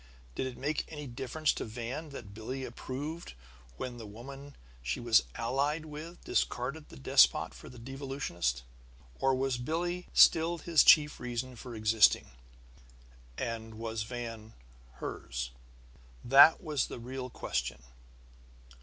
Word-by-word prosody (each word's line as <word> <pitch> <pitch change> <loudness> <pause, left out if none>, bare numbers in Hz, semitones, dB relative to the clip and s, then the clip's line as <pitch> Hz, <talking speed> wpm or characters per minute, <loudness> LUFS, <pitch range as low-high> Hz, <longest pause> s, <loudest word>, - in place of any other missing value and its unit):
Did 130 - -2
it 130 - -7
make 145 +2 -1
any 150 -2 -6
difference 135 +5 -1
to - - -4
Van 120 +7 -5
that 115 -8 -9
Billie 130 +5 -5
approved 145 +7 -6 0.4
when 125 -1 -5
the 115 -2 -8
woman 135 +6 -10 0.3
she 60 +1 -2
was 120 -2 +5
allied 140 +7 0
with 155 +3 -9
discarded 135 +6 -1
the - - -12
despot 65 -2 +4
for - - -11
the 125 - -12
devolutionist? 130 - -3 0.6
Or 135 0 +3
was 130 -1 0
Billie 175 +7 -2
still 165 +1 +6
his 165 -2 +4
chief 150 -1 +6
reason 125 +1 -4
for 120 0 -8
existing, 110 - +4 1.1
and 115 -1 -4
was 115 0 -4
Van 115 -1 -6 0.4
hers? - - -5 0.7
That 140 +8 +8
was 150 -5 0
the - - -7
real 130 +2 -6
question! - - -3
125 Hz, 130 wpm, -31 LUFS, 115-145 Hz, 1.1 s, That